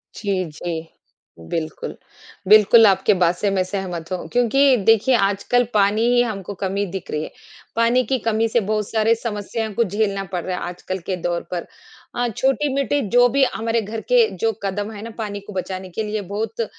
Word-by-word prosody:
जी, 195 Hz, -4 st, -1 dB
जी 160 Hz, +1 st, -5 dB, 0.7 s
बिल्कुल। 160 Hz, -1 st, -4 dB, 0.5 s
बिल्कुल, 215 Hz, +2 st, +7 dB
आपकी 190 Hz, 0 st, +3 dB
बात 175 Hz, 0 st, +4 dB
से 205 Hz, -, 0 dB
मैं 190 Hz, -1 st, +1 dB
सहमत 185 Hz, -3 st, -5 dB
हूँ 185 Hz, -, -4 dB
क्योंकि 255 Hz, +3 st, +4 dB
देखिए 225 Hz, +3 st, +5 dB
आजकल 200 Hz, +4 st, +2 dB
पानी 210 Hz, +2 st, +3 dB
ही 245 Hz, -, +5 dB
हमको 205 Hz, -4 st, -5 dB
कमी 195 Hz, +1 st, -2 dB
दिख 190 Hz, -2 st, -6 dB
रही 150 Hz, 0 st, -2 dB
है। -, -, -7 dB, 0.4 s
पानी 235 Hz, +2 st, +3 dB
की 265 Hz, -, 0 dB
कमी 225 Hz, 0 st, +2 dB
से 235 Hz, -, +2 dB
बहुत 210 Hz, 0 st, -2 dB
सारें 225 Hz, 0 st, +3 dB
समस्याओं 220 Hz, -1 st, -4 dB
को 235 Hz, -, +2 dB
झेलना 200 Hz, -1 st, -1 dB
पड़ 175 Hz, -2 st, -2 dB
रहा 185 Hz, -1 st, -2 dB
है -, -, -5 dB
आजकल 185 Hz, +1 st, -5 dB
के 190 Hz, -, 0 dB
दौर 170 Hz, 0 st, -1 dB
पर 175 Hz, -2 st, -3 dB, 0.5 s
अ, 245 Hz, 0 st, 0 dB
छोटी-मोटी 275 Hz, +1 st, +1 dB
जो 245 Hz, +1 st, +5 dB
भी 275 Hz, +2 st, +2 dB
हमारे 225 Hz, +1 st, 0 dB
घर 220 Hz, +2 st, -5 dB
के 240 Hz, -3 st, +5 dB
जो 225 Hz, -, +2 dB
कदम 205 Hz, +2 st, -2 dB
है 205 Hz, -, -8 dB
ना 230 Hz, -, -6 dB
पानी 205 Hz, -2 st, -4 dB
को 205 Hz, -, -11 dB
बचाने 185 Hz, 0 st, -4 dB
के 220 Hz, +5 st, -3 dB
लिए 210 Hz, 0 st, -3 dB
बहुत 210 Hz, +4 st, -4 dB
अ, -, -, 0 dB
210 Hz, 195 wpm, -21 LUFS, 190-230 Hz, 0.7 s, बिल्कुल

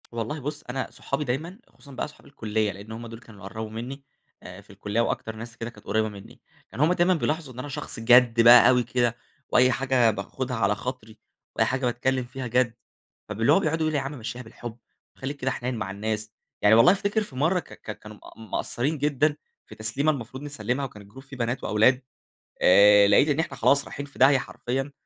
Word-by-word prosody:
والله 115 Hz, +6 st, -4 dB
بُص 150 Hz, +2 st, -5 dB
أنا 130 Hz, +1 st, -3 dB
صحابي 135 Hz, +2 st, -3 dB
دايمًا، 155 Hz, -, -4 dB
خصوصًا 140 Hz, -, -17 dB
بقى 130 Hz, -, -4 dB
صحاب 150 Hz, -, -18 dB
الكلية 110 Hz, -5 st, -2 dB
لإن 100 Hz, +4 st, -11 dB
هم 115 Hz, +1 st, -7 dB
دول 115 Hz, 0 st, -10 dB
كانوا 105 Hz, -4 st, -15 dB
قربوا 110 Hz, +3 st, -6 dB
مني، 125 Hz, +5 st, -7 dB, 0.4 s
آآ 90 Hz, +2 st, -10 dB
في 100 Hz, -, -26 dB
الكلية 105 Hz, +3 st, -2 dB
وأكتر 110 Hz, -1 st, -2 dB
ناس 115 Hz, +2 st, -9 dB
كده 115 Hz, -, -5 dB
كانت 120 Hz, -, -17 dB
قريبة 110 Hz, 0 st, 0 dB
مني، 100 Hz, -2 st, -13 dB, 0.3 s
كان -, -, -9 dB
هم 155 Hz, +5 st, +4 dB
دايمًا 180 Hz, +1 st, +3 dB
بيلاحظوا 155 Hz, -4 st, -2 dB
إن 125 Hz, -, -10 dB
أنا 130 Hz, -, -5 dB
شخص 135 Hz, -, -6 dB
جَد 120 Hz, 0 st, +5 dB
بقى 120 Hz, +1 st, +8 dB
أوي 125 Hz, -1 st, +3 dB
كده 120 Hz, 0 st, 0 dB, 0.3 s
وأي 130 Hz, +1 st, +4 dB
حاجة 125 Hz, -2 st, +2 dB
باخدها 125 Hz, +5 st, -4 dB
على 105 Hz, -1 st, +2 dB
خاطري، 110 Hz, -1 st, -7 dB, 0.4 s
وأي -, -, +3 dB
حاجة 130 Hz, 0 st, -1 dB
باتكلم 125 Hz, +1 st, 0 dB
فيها 125 Hz, +1 st, -6 dB
جَد، 120 Hz, 0 st, +1 dB, 0.6 s
فب 105 Hz, +1 st, -5 dB
اللي 120 Hz, +5 st, +4 dB
هو 195 Hz, -, +5 dB
بيقعدوا 160 Hz, -2 st, -1 dB
يقولوا: 155 Hz, -1 st, 0 dB
"يا -, -, -4 dB
عم 140 Hz, -1 st, -6 dB
مشيها 115 Hz, +2 st, -6 dB
بالحب، 115 Hz, 0 st, -9 dB, 0.4 s
خليك 140 Hz, +2 st, -5 dB
كده 130 Hz, -1 st, -1 dB
حنين 125 Hz, 0 st, -3 dB
مع 95 Hz, -4 st, -4 dB
الناس." 105 Hz, +1 st, -4 dB, 0.3 s
يعني 105 Hz, +2 st, +6 dB
والله 115 Hz, +10 st, +7 dB
أفتكر 200 Hz, +2 st, 0 dB
في 140 Hz, -, -11 dB
مرة 160 Hz, +8 st, +2 dB
ك -, -, -12 dB
ك 105 Hz, -, -9 dB
كانوا 105 Hz, 0 st, -12 dB
مق -, -, -16 dB
مقصرين 120 Hz, +6 st, -2 dB
جدًا 145 Hz, +1 st, +1 dB, 0.3 s
في -, -, -12 dB
تسليمة 120 Hz, +8 st, +1 dB
المفروض 130 Hz, 0 st, -7 dB
نسلمها 135 Hz, -1 st, -3 dB
وكان 105 Hz, -5 st, -10 dB
الجروب 105 Hz, +7 st, -14 dB
فيه 135 Hz, -1 st, -11 dB
بنات 120 Hz, +1 st, -2 dB
وأولاد، 120 Hz, +5 st, +3 dB, 0.6 s
آآ 100 Hz, +2 st, +7 dB
لقيت 100 Hz, +8 st, +5 dB
إن 145 Hz, +1 st, +1 dB
إحنا 165 Hz, -, -2 dB
خلاص 140 Hz, 0 st, +3 dB
رايحين 140 Hz, -, -7 dB
في 140 Hz, -, -16 dB
داهية 135 Hz, +2 st, +6 dB
حرفيًا، 135 Hz, +1 st, -4 dB
125 Hz, 210 wpm, -25 LUFS, 110-140 Hz, 0.6 s, بقى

